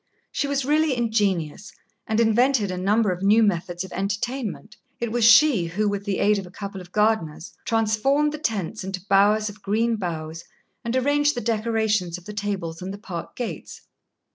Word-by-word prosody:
She 285 - -1
was 280 -2 -1
really 300 -2 +2
ingenious, 205 -6 -1 0.4
and 220 0 0
invented 230 -1 +3
a - - -3
number 205 +2 +2
of 180 0 -4
new 210 +3 +5
methods 175 -3 -1
of 190 - -10
entertainment. 210 +2 -3 0.2
It 235 -2 -2
was 240 0 0
she 230 - +6
who, 195 +6 -1
with 200 0 -2
the 200 -2 -1
aid 205 0 +3
of 190 - -8
a - - -12
couple 200 0 -7
of 180 0 -14
gardeners, 210 -7 0
transformed 230 +7 +2
the 305 - -6
tents 215 - -2
into 190 -1 -6
bowers 205 +2 +4
of 205 0 -9
green 225 +3 0
boughs 165 -3 -5 0.4
and 235 +1 -2
arranged 290 +3 +2
the - - -2
decorations 220 -6 0
of 180 - -15
the 210 - -7
tables 195 -5 -4
and 185 +1 -5
the 200 - -7
park 175 -5 -7
gates. 245 - -6
210 Hz, 185 wpm, -24 LUFS, 190-230 Hz, 0.4 s, she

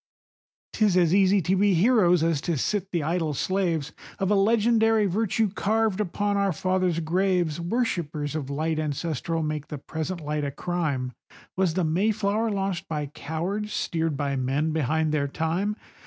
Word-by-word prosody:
'Tis 205 -4 +3
as 175 -2 +4
easy 195 -1 +4
to 185 +4 +2
be 200 0 +3
heroes 180 -4 +4
as 165 -4 +1
to 170 -1 -1
sit 195 +7 -1
the 170 -4 0
idle 160 -1 -1
slaves 170 -4 -1 0.3
Of 195 0 0
a - - +5
legendary 225 +1 +3
virtue 215 +2 0
carved 215 0 0
upon 205 +1 -1
our 200 -1 +2
father's 185 +1 0
graves, 175 -1 0
Worshippers 170 - -2
of 140 -4 -3
light 155 +2 -1
ancestral 160 +2 -2
make 155 -1 -3
the 150 - -6
present 160 +5 -4
light 150 0 -2
a 140 - -1
crime;— 140 -5 -2 0.4
Was 185 -3 +1
the 185 - +1
Mayflower 205 +6 +1
launched 195 -3 -2
by 150 -3 -3
cowards, 190 +8 -3
steered 160 -3 -1
by 140 -1 -1
men 135 +5 0
behind 155 +1 0
their 145 -2 0
time? 175 +8 -1
175 Hz, 160 wpm, -26 LUFS, 155-200 Hz, 0.4 s, a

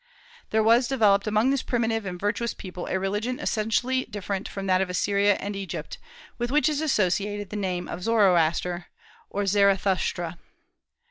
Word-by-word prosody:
There 220 0 +2
was 235 +3 +4
developed 215 -6 +3
among 215 +5 +2
this 275 -1 +1
primitive 225 -3 -1
and 180 -1 -5
virtuous 220 +4 -1
people 180 -2 -7
a - - 0
religion 210 +6 -2
essentially 245 +4 0
different 200 -1 -4
from 195 -1 -5
that 185 -1 +3
of 190 - -1
Assyria 200 +2 +2
and 200 +1 -5
Egypt, 195 -1 -6 0.4
with 240 0 -1
which 300 +4 +3
is 305 -1 0
associated 205 - 0
the - - -5
name 185 -3 -2
of 180 - -6
Zoroaster, 180 -5 +2 0.4
or 205 - -2
Zarathushtra. 195 -3 +1
205 Hz, 155 wpm, -26 LUFS, 190-225 Hz, 0.4 s, was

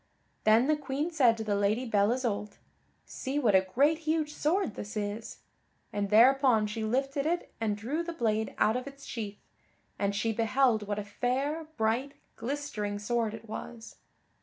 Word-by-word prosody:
Then 220 +3 +6
the 305 +2 +3
Queen 295 +3 -3
said 250 -8 +4
to 220 - -3
the 210 -1 -1
Lady 205 +5 +1
Belle 210 -2 +2
Isoult, 215 -5 -2 0.5
"See 270 +2 -4
what 240 -8 +3
a 190 - +7
great 280 +12 +2
huge 310 -1 -1
sword 315 - 0
this 210 +3 -6
is," 210 +2 -4 0.5
and 205 -1 -1
thereupon 245 0 +5
she 215 +1 -4
lifted 270 +5 0
it 345 +2 -2
and 210 -2 0
drew 265 +10 -2
the 340 0 -4
blade 220 -7 -1
out 220 - +3
of 255 +2 -3
its 275 0 -10
sheath, 210 -4 -6 0.6
and 200 0 0
she 225 +2 0
beheld 225 -1 +2
what 205 0 -2
a 210 - -2
fair, 265 +9 -1
bright, 235 +5 0 0.2
glistering 230 -5 -3
sword 225 +1 -1
it 225 +1 -12
was. 230 +1 -8
230 Hz, 170 wpm, -30 LUFS, 210-275 Hz, 0.6 s, a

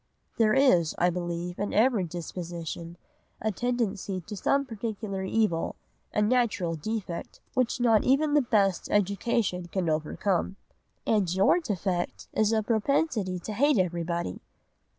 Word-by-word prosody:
"'There 215 -1 +4
is, 180 - +4
I 175 +1 +3
believe, 175 0 -4
in 205 - -2
every 220 -3 +3
disposition 170 0 -6 0.4
a 220 - 0
tendency 210 -5 -1
to 210 +4 -8
some 275 +7 +1
particular 215 -4 -4
evil, 190 -4 0 0.4
a 210 - +1
natural 220 -6 +1
defect, 180 +1 -5
which 255 0 +1
not 230 -3 +4
even 290 +3 +3
the 295 - +5
best 200 -7 +1
education 200 -2 0
can 175 -1 -1
overcome.' 170 +5 0 0.5
"'And 205 -6 +2
your 190 - +4
defect 190 - -3
is 215 0 +2
a 220 -1 +2
propensity 220 - +1
to 215 - -5
hate 285 +5 +3
everybody. 170 - -1
200 Hz, 130 wpm, -28 LUFS, 175-230 Hz, 0.5 s, the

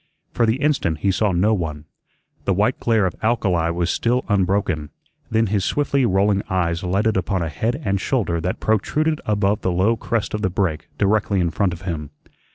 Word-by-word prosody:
For 115 - +2
the 110 - +3
instant 130 - 0
he 100 - +2
saw 105 +1 +1
no 95 +5 +2
one. 80 -6 -3 0.6
The 95 - +1
white 105 +6 +1
glare 115 -4 +2
of 90 - -1
alkali 95 -7 +1
was 85 0 0
still 125 +2 0
unbroken. 95 -6 +1 0.4
Then 110 0 +2
his 100 -2 0
swiftly 140 -1 +1
rolling 100 0 +2
eyes 85 -2 0
lighted 100 +4 +1
upon 95 -1 -1
a 80 - -2
head 115 - -2
and 95 0 0
shoulder 95 -11 0
that 90 +3 -2
protruded 150 +9 0
above 105 -1 +1
the 95 - 0
low 95 +6 +2
crest 115 0 -2
of 105 - -2
the 95 - +1
break 85 -5 -2
directly 105 -1 +1
in 85 -2 +1
front 95 +3 +1
of 90 +1 -8
him. 80 -5 -4
100 Hz, 190 wpm, -21 LUFS, 90-110 Hz, 0.6 s, the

